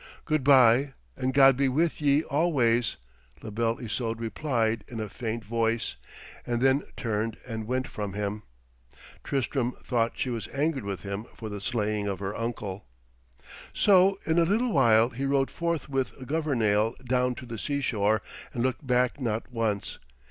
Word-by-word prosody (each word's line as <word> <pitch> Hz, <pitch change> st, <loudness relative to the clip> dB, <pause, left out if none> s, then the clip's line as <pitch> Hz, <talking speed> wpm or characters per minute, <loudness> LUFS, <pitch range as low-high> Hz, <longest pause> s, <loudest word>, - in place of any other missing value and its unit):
'Good 155 Hz, -3 st, +1 dB
bye 135 Hz, 0 st, +5 dB, 0.2 s
and 130 Hz, 0 st, -1 dB
God 135 Hz, -1 st, +6 dB
be 135 Hz, +1 st, +2 dB
with 160 Hz, +4 st, 0 dB
ye 145 Hz, +1 st, +3 dB
always,' 130 Hz, -8 st, +1 dB, 0.5 s
La 110 Hz, -, -6 dB
Belle 115 Hz, +2 st, 0 dB
Isoude 115 Hz, -1 st, -3 dB
replied 115 Hz, -1 st, -1 dB
in 115 Hz, -, -7 dB
a 110 Hz, -, -3 dB
faint 110 Hz, +1 st, -5 dB
voice, 115 Hz, +1 st, 0 dB, 0.5 s
and 120 Hz, -1 st, -1 dB
then 135 Hz, +2 st, +3 dB, 0.2 s
turned 110 Hz, -1 st, -2 dB
and 110 Hz, -2 st, -5 dB
went 130 Hz, +1 st, -1 dB
from 105 Hz, -3 st, -5 dB
him. 105 Hz, +1 st, -3 dB, 0.8 s
Tristram 130 Hz, -2 st, -1 dB
thought 115 Hz, -2 st, -1 dB
she 130 Hz, -, -1 dB
was 115 Hz, -2 st, -4 dB
angered 140 Hz, -4 st, -1 dB
with 100 Hz, -2 st, -4 dB
him 100 Hz, +2 st, -5 dB
for 110 Hz, -, -7 dB
the 105 Hz, -1 st, -6 dB
slaying 105 Hz, -2 st, -1 dB
of 100 Hz, -1 st, -2 dB
her 100 Hz, +1 st, -4 dB
uncle. 105 Hz, -, -4 dB, 0.9 s
So 195 Hz, -1 st, +5 dB
in 160 Hz, +1 st, +2 dB
a -, -, +5 dB
little 225 Hz, +8 st, +1 dB
while 115 Hz, -4 st, +5 dB
he 130 Hz, +3 st, -4 dB
rode 135 Hz, -1 st, +1 dB
forth 170 Hz, -4 st, -2 dB
with 135 Hz, -2 st, -2 dB
Governale 115 Hz, -8 st, +1 dB
down 125 Hz, 0 st, +1 dB
to 125 Hz, -, -9 dB
the 115 Hz, -2 st, -6 dB
seashore 110 Hz, -7 st, 0 dB, 0.3 s
and 120 Hz, -, 0 dB
looked 130 Hz, +2 st, -2 dB
back 125 Hz, +2 st, +2 dB
not 115 Hz, 0 st, -2 dB
once. 110 Hz, -4 st, -2 dB
120 Hz, 165 wpm, -27 LUFS, 110-135 Hz, 0.9 s, God